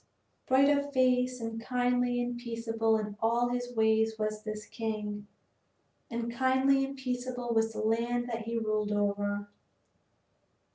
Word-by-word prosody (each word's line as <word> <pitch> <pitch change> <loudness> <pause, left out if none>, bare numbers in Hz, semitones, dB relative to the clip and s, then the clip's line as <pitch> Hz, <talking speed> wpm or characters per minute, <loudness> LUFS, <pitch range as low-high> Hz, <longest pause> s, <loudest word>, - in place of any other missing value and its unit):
Bright 275 +2 +5
of 285 0 -2
face 255 -1 +2
and 225 0 -4
kindly 245 0 +1
and 245 0 -3
peaceable 225 -1 0
in 210 -1 -4
all 235 +2 +2
his 245 0 -2
ways 220 0 +3
was 215 0 -2
this 215 -1 -5
king, 210 -2 -4 0.8
and 235 0 -3
kindly 265 +2 +3
and 275 0 -4
peaceable 250 -2 -3
was 225 0 +2
the - - -3
land 235 +2 0
that 230 -2 -4
he 230 +1 -2
ruled 215 -2 0
over. 205 0 0
230 Hz, 140 wpm, -30 LUFS, 220-250 Hz, 0.8 s, Bright